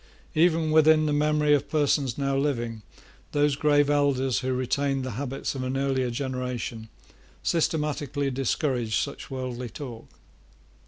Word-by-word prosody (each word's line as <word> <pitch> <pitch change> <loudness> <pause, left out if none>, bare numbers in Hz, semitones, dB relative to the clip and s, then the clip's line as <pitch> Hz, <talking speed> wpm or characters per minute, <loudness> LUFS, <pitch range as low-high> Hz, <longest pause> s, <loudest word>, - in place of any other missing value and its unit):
Even 160 -1 +3
within 155 0 +5
the 150 - +1
memory 150 0 +3
of 145 - +1
persons 145 -4 +1
now 140 -1 0
living 120 -6 -1 0.5
those 145 -1 +3
grave 145 -1 +3
elders 140 -3 +2
who 130 0 -2
retained 135 +2 0
the 130 - -4
habits 135 +4 -3
of 135 - -4
an 130 +1 -2
earlier 135 -2 0
generation 125 -3 -4 0.5
systematically 150 -4 0
discouraged 125 -3 -1
such 140 - -3
worldly 125 -2 -4
talk. 120 -3 -8
140 Hz, 130 wpm, -26 LUFS, 125-150 Hz, 0.5 s, within